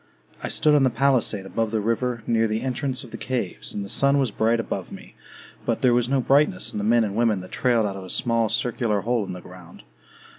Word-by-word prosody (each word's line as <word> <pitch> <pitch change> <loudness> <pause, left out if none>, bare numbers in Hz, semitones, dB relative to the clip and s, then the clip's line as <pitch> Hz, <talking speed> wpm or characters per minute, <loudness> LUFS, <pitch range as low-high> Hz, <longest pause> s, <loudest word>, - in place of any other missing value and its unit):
I - - -4
stood 150 - +2
on 145 - +4
the 130 - +4
palisade 120 -5 +2
above 115 +3 -2
the 110 0 -1
river, 115 +2 -1
near 115 -1 +2
the 110 +1 -2
entrance 130 +1 -2
of 120 - -13
the - - -6
caves; 125 -8 -3
and 100 - -4
the - - -8
sun 140 +7 +2
was 135 -5 +1
bright 115 +3 +1
above 115 - -4
me; - - -11 0.5
but - - -2
there 125 -2 +5
was 120 0 +1
no 135 0 +2
brightness 150 +8 +2
in - - -4
the - - -3
men 115 +2 +3
and 100 -2 -3
women 115 -3 +2
that 90 - -12
trailed 120 -4 +1
out 100 -2 -3
of 95 - -8
a - - -11
small 115 +1 +1
circular 115 -4 -1
hole 115 -2 -1
in - - -5
the 90 - -8
ground. 90 -6 -14
115 Hz, 245 wpm, -23 LUFS, 105-130 Hz, 0.5 s, there